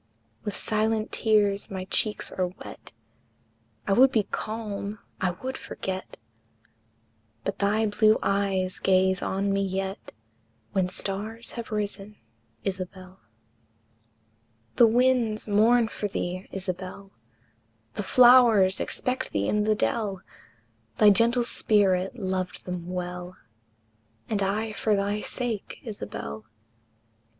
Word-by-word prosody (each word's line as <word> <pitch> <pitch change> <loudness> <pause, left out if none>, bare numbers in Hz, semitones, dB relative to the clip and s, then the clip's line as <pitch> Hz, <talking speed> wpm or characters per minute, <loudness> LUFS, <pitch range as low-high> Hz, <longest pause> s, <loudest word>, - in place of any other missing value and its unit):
With 205 - -4
silent 220 0 0
tears 205 -2 +2
my 190 -1 -5
cheeks 210 +2 0
are 185 -1 -1
wet, 180 - -11 0.9
I 195 - +2
would 260 +5 +6
be 220 -5 +2
calm, 215 -1 -4 0.2
I 185 - +2
would 260 0 -3
forget, 190 0 -6 1.3
But - - -3
thy 210 +2 +2
blue 215 +1 +4
eyes 195 -2 0
gaze 190 -1 +3
on 195 +1 -1
me 195 - +1
yet, 195 0 -3 0.6
When 190 -2 +1
stars 210 +5 -4
have 235 -2 -7
risen, 210 -1 -3 0.5
Isabel. 185 -1 -6 1.6
The 235 - +8
winds 235 -2 +2
mourn 225 +3 +4
for 210 - -4
thee, 185 -1 -4
Isabel, 190 +1 -6 0.8
The - - -3
flowers 235 -4 +6
expect 255 +1 -2
thee 100 0 -1
in 210 0 +1
the 215 0 +3
dell, 205 -3 -1 0.7
Thy 210 -1 +7
gentle 235 +4 +3
spirit 200 -2 +2
loved 185 -3 -3
them 180 -1 -5
well; 180 0 -5 0.9
And 210 -2 -1
I 210 +3 0
for 215 0 +1
thy 200 +1 -1
sake, 235 -5 -4
Isabel! 110 - -7
200 Hz, 115 wpm, -26 LUFS, 190-220 Hz, 1.6 s, The